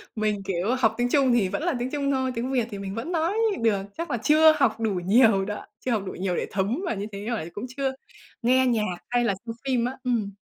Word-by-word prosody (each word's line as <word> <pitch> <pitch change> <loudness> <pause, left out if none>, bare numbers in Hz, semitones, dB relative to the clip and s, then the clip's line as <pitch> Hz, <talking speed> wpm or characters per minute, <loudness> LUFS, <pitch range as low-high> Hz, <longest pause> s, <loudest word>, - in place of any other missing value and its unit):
Mình, 210 -2 -1
kiểu, 195 +6 0
học 225 -3 +3
tiếng 245 0 +1
Trung 265 -3 +3
thì 210 -6 +3
vẫn 300 - -3
là 350 - +1
tiếng 250 +2 -3
Trung 280 -1 0
thôi, 260 -1 0
tiếng 245 +3 -2
Việt 245 -3 +1
thì 200 - -5
mình 195 +1 -5
vẫn 260 +10 -4
nói 335 +3 +1 0.3
được, 210 -4 +2 0.2
chắc 335 +1 -4
là 240 - 0
chưa 310 +5 +6
học 235 -6 +2
đủ 220 -2 0
nhiều 210 -2 +5
đó, 210 0 -5 0.2
chưa 255 - 0
học 215 -4 0
đủ - - -4
nhiều 180 -1 -2
để - - -2
thấm 205 - -1
vào 235 - -1
như 200 +1 -4
thế, 200 +1 -7
rồi 220 -9 -3
cũng 205 - -5
chưa 270 -1 0 0.5
nghe 260 +2 +4
nhạc 215 -7 0
hay 245 0 +2
là 200 - +2
xem 230 - -4
phim 250 -3 +1
á. 255 - -2
Ừm. 230 -5 0
235 Hz, 260 wpm, -25 LUFS, 205-260 Hz, 0.5 s, chưa